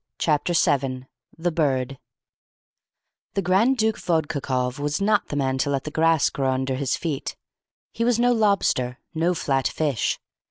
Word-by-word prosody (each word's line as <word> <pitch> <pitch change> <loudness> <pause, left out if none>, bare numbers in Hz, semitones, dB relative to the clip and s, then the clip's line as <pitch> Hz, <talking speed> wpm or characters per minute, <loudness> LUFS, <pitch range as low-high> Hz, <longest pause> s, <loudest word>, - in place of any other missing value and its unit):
Chapter 155 +2 +1
7 135 -6 +1 0.3
THE 175 +1 -1
BIRD 135 -4 0 1.4
The 195 - +1
Grand 205 +9 +3
Duke 220 -1 +1
Vodkakoff 140 -6 -1
was 145 +1 -1
not 205 0 +2
the - - -5
man 130 -2 0
to 140 - +1
let 140 -2 -1
the 150 - -6
grass 160 0 +3
grow 135 -1 -1
under 130 0 -1
his 130 0 -1
feet. 155 -5 -3 0.6
He 230 - -1
was 240 -1 +3
no 245 +1 +3
lobster, 200 - +1 0.2
no 170 +3 +1
flat 135 -4 0
fish. 145 -7 -1
150 Hz, 155 wpm, -24 LUFS, 135-180 Hz, 1.4 s, Grand